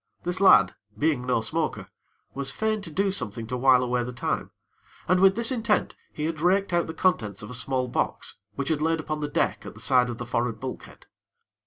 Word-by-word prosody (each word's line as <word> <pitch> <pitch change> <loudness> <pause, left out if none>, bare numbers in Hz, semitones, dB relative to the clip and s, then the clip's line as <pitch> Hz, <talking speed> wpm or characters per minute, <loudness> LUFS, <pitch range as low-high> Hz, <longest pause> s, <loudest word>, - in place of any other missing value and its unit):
This 180 +2 -1
lad, 100 - +6 0.2
being 140 -2 0
no 125 -3 +2
smoker, 115 - -2 0.5
was 135 0 -2
fain 215 +3 -1
to 190 - -8
do 195 +5 0
something 115 - -5
to 120 +3 -4
while 125 0 +5
away 125 0 0
the 125 - -5
time, 120 - -3 0.6
and 185 +1 +3
with 190 0 +6
this 235 +2 +3
intent, 225 -4 0 0.2
he 150 - -4
had 160 -1 -3
raked 190 +2 +2
out 170 0 +2
the 160 - -5
contents 105 - 0
of 105 - -8
a - - -7
small 130 +1 0
box, 120 - -2 0.2
which 140 -1 -3
had 155 -2 0
lain 165 +1 +1
upon 155 0 -3
the 150 - -2
deck - - 0
at - - -9
the - - -12
side 125 -1 +3
of 120 - -5
the 120 - -5
forrard 120 -1 -1
bulkhead. 130 -1 -8
140 Hz, 215 wpm, -26 LUFS, 125-175 Hz, 0.6 s, lad